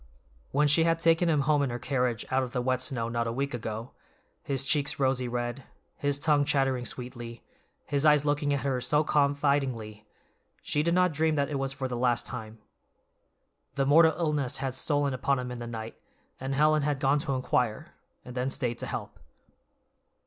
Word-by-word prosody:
When 145 +2 +3
she 150 +3 +4
had 165 0 +2
taken 165 +1 +3
him 150 -3 +3
home 145 +1 +2
in 140 - 0
her 120 - -3
carriage 125 -2 -1
out 130 0 +3
of 125 -2 -5
the 125 - 0
wet 130 0 0
snow 130 -4 -2
not 115 0 -1
a - - -1
week 140 +3 -2
ago, 115 0 -5 0.5
his 135 -1 -1
cheeks 145 0 +1
rosy 130 -2 +1
red, 120 +2 -3 0.3
his 145 -1 0
tongue 145 -1 +3
chattering 135 -3 +1
sweetly, 120 -2 -7 0.4
his 140 -1 0
eyes 150 -1 +5
looking 145 0 +1
at 140 -1 0
her 130 -3 -1
so 150 +4 +2
confidingly, 140 -8 0 0.6
she 150 - 0
did 170 +2 +1
not 180 -1 +3
dream 155 +1 +1
that 140 0 0
it 140 - -1
was 135 0 -2
for 135 -1 -3
the 125 - -4
last 120 0 +1
time. 110 -3 -7 1.2
The 135 -1 +1
mortal 160 +3 +6
illness 150 -6 0
had 135 -1 -3
stolen 145 +1 0
upon 135 +2 0
him 125 0 -4
in 125 - -6
the 120 - -6
night, 115 -1 -7 0.4
and 135 +1 -3
Helen 155 +2 +4
had 145 -1 -1
gone 140 +1 +2
to 145 -2 -2
inquire, 125 -3 -1 0.3
and 125 - -8
then 125 +1 -1
stayed 125 -4 -2
to - - -4
help. - - -6
135 Hz, 190 wpm, -28 LUFS, 125-145 Hz, 1.2 s, mortal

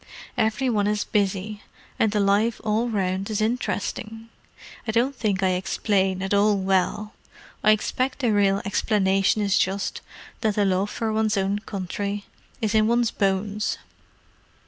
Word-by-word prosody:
Every 225 +2 +1
one 210 -4 +1
is 210 0 0
busy, 205 +1 -1 0.4
and 220 - +3
the 210 - 0
life 205 +3 +2
all 220 +3 +1
round 195 -2 -1
is 215 -1 -1
interesting. 225 0 -2 0.6
I - - +1
don't 245 +5 +1
think 200 -5 -1
I 190 - +4
explain 190 +1 0
at 195 - -1
all 205 0 +4
well; 195 +3 0 0.5
I 215 - +5
expect 255 +5 +1
the 245 -5 +1
real 200 -1 +2
explanation 195 0 +2
is 200 -1 +2
just 195 +1 -1 0.4
that 215 -2 0
the 205 - +2
love 190 +1 +1
for 225 -1 -2
one's 215 -1 +1
own 195 +1 0
country 200 0 -4 0.4
is 220 -1 0
in 215 0 +4
one's 235 0 +2
bones!" 200 +1 -1
205 Hz, 150 wpm, -24 LUFS, 195-220 Hz, 0.6 s, I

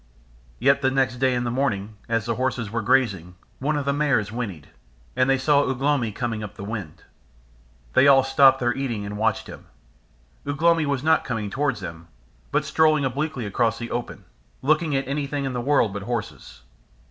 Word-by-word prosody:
Yet 135 +3 +3
the 130 - +3
next 130 -2 0
day 130 0 +2
in 120 - -1
the 120 - -2
morning, 110 -5 -1
as 115 -2 0
the 115 - 0
horses 120 -3 -2
were 115 0 -1
grazing, 105 - +1 0.2
one 150 +3 0
of 145 - -2
the 140 - +1
mares 140 -8 +1
whinnied, 105 -10 -5 0.5
and 130 +1 +2
they 135 - +4
saw 140 +2 +3
Ugh 130 -3 -2
lomi 135 -5 +1
coming 115 0 -3
up 105 0 -8
the 100 - -8
wind. 100 -7 -6 0.9
They 140 - +5
all 135 -1 +7
stopped 135 0 +5
their 120 -1 +1
eating 120 -6 -3
and 100 +1 -5
watched 110 +1 0
him. - - -11 0.8
Ugh 145 0 -3
lomi 165 -2 +3
was 140 -2 -1
not 160 0 +3
coming 110 -5 -3
towards 135 -5 -1
them, 85 -2 -8 0.4
but - - +1
strolling 155 -3 +3
obliquely 135 -1 -2
across 115 +2 0
the 120 0 -6
open, 120 0 -5 0.4
looking 155 +1 +2
at 135 -1 -1
anything 140 0 -2
in 135 - -3
the 120 - -2
world 125 -6 +2
but 100 - -5
horses. 115 +1 -6
125 Hz, 195 wpm, -24 LUFS, 110-140 Hz, 0.9 s, all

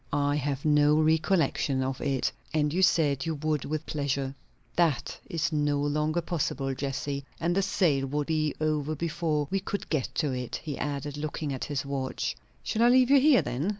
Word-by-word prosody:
"I 145 0 +1
have 140 -1 -2
no 150 0 +5
recollection 155 -3 +2
of 130 0 -3
it." 135 -2 0 0.2
"And 150 -1 +2
you 185 - +1
said 150 -6 +3
you 160 - -1
would 150 -1 -1
with 155 +1 -3
pleasure." 140 -2 -2 0.4
"That 165 -7 +1
is 170 +1 -1
no 145 -2 +1
longer 150 +3 0
possible, 145 -5 -2
Jessie. 140 +1 -3 0.2
And 170 +1 +1
the 195 - +2
sale 165 -8 +1
would 145 +2 -1
be 155 -1 0
over 155 0 0
before 160 -2 -1
we 195 - +1
could 200 +1 -4
get 150 -6 0
to 150 -4 0
it," 125 -2 -4
he 150 -3 -4
added, 145 0 -3
looking 150 -1 -3
at 130 - -4
his 145 -2 -3
watch. 135 -2 -2 0.3
"Shall 220 - -1
I 240 - +6
leave 255 +1 +5
you 280 - +8
here, 280 -1 +5
then?" 140 +10 -2
150 Hz, 185 wpm, -28 LUFS, 140-160 Hz, 0.4 s, you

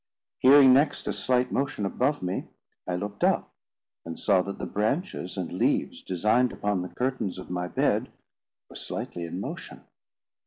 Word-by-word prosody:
Hearing 135 0 +8
next 145 +3 +2
a - - 0
slight 125 -1 +1
motion 135 -7 -1
above 130 +7 0
me, 90 +1 -3 0.4
I 90 - -1
looked 100 +3 -5
up, - - +2 0.5
and 85 0 -7
saw 95 -3 +3
that 100 +2 -5
the - - -4
branches 110 - -2
and 90 -2 -4
leaves 90 - 0
designed 110 +7 +2
upon 105 -3 -1
the 90 - -5
curtains 125 -8 -2
of 95 - -9
my 90 0 -2
bed - - +1 0.6
were - - -15
slightly 85 -1 -5
in 85 +2 -5
motion. - - -7
105 Hz, 160 wpm, -27 LUFS, 90-130 Hz, 0.6 s, Hearing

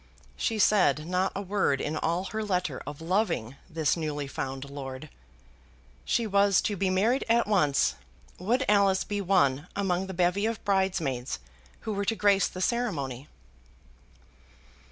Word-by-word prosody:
She 225 - -1
said 180 -8 +3
not 185 +2 0
a 200 - -3
word 195 -8 +1
in 150 - -2
all 170 +3 0
her 220 +3 -4
letter 180 -8 -1
of 145 +1 -7
loving 165 - -1
this 160 -3 +1
newly 150 -3 -3
found 135 0 -5
lord. 140 0 -7 0.9
"She 235 - +1
was 200 -2 +4
to 205 - -1
be 190 0 0
married 215 +8 +2
at 235 +1 +4
once. 165 -10 +2 0.5
Would 240 +9 +1
Alice 200 -2 +4
be 205 -1 -3
one 175 -6 +2
among 190 -2 0
the 190 - -6
bevy 180 +4 +2
of 230 -1 -4
bridesmaids 170 - 0 0.4
who 220 - -3
were 200 0 -2
to 225 - +1
grace 200 -2 +3
the 185 - -7
ceremony?" 150 - -2
185 Hz, 150 wpm, -28 LUFS, 150-205 Hz, 0.9 s, was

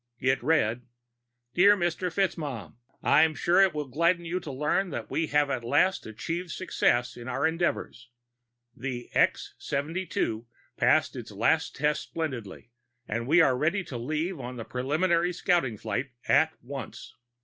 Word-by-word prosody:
It 130 +2 +1
read: 125 -6 +2
My - - -26 0.7
dear 200 +6 +6
Mr. 175 0 -1
FitzMaugham: 145 - -2 0.3
_I'm 155 +2 +4
sure 175 +3 +4
it 190 -5 +4
will 150 -1 -2
gladden 170 +6 +1
you 175 +2 -2
to 160 -5 -7
learn 150 +8 0
that - - -6
we 165 - 0
have 145 -1 +2
at 125 -3 -2
last 185 +9 +2
achieved 165 +11 -4
success 125 -8 0
in 120 0 -9
our 135 +3 -1
endeavors. 160 -7 -1 0.7
The 125 -2 -5
X - - +2
72 140 -6 -2 0.3
passed - - +3
its - - -7
last - - +1
tests 150 +1 0
splendidly, 125 -9 -5 0.4
and 115 +3 -3
we 165 +5 +6
are 135 -5 +4
ready 170 +9 0
to 130 - -7
leave 155 +7 -2
on 125 0 -6
the 115 -2 -6
preliminary 170 +7 +1
scouting 165 -10 +1
flight 130 +6 -3 0.2
at 155 +3 +4
once. 135 +1 -8
150 Hz, 155 wpm, -28 LUFS, 125-170 Hz, 0.7 s, dear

